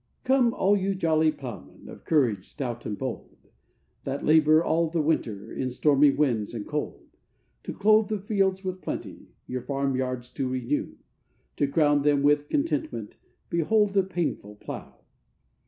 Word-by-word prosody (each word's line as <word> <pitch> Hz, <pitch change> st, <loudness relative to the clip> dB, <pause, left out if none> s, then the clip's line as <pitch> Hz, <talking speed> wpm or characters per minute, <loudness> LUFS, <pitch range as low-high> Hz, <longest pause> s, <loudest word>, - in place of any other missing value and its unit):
] -, -, -46 dB
'COME, 260 Hz, -2 st, +3 dB
all 200 Hz, +2 st, +3 dB
you 195 Hz, 0 st, 0 dB
jolly 160 Hz, -3 st, +2 dB
ploughmen, 120 Hz, -, -10 dB
of -, -, -12 dB
courage 120 Hz, -, +1 dB
stout 120 Hz, -4 st, -5 dB
and 105 Hz, -, -4 dB
bold, 130 Hz, -3 st, -6 dB, 0.7 s
That 135 Hz, +1 st, -4 dB
labour 155 Hz, +1 st, +5 dB
all 165 Hz, 0 st, +1 dB
the 165 Hz, +1 st, -1 dB
winter 120 Hz, -10 st, -1 dB
in 130 Hz, -, -2 dB
stormy 145 Hz, +3 st, +4 dB
winds, 120 Hz, -7 st, 0 dB
and 110 Hz, -, -5 dB
cold; 150 Hz, 0 st, -4 dB, 0.6 s
To -, -, -6 dB
clothe 215 Hz, +1 st, +4 dB
the 215 Hz, -, -1 dB
fields 195 Hz, -1 st, 0 dB
with 185 Hz, 0 st, -4 dB
plenty, -, -, -6 dB, 0.2 s
your 125 Hz, 0 st, -4 dB
farm 140 Hz, 0 st, -1 dB
yards 125 Hz, -1 st, -3 dB
to 135 Hz, -3 st, -2 dB
renew, 130 Hz, +2 st, -2 dB, 0.6 s
To 145 Hz, -, +2 dB
crown 145 Hz, 0 st, +3 dB
them 145 Hz, -1 st, +2 dB
with 145 Hz, 0 st, +3 dB
contentment, 310 Hz, +1 st, -2 dB, 0.3 s
behold 205 Hz, +5 st, +2 dB
the 195 Hz, -, +4 dB
painful 175 Hz, -, -3 dB
plough! -, -, -9 dB
150 Hz, 155 wpm, -26 LUFS, 130-185 Hz, 0.7 s, labour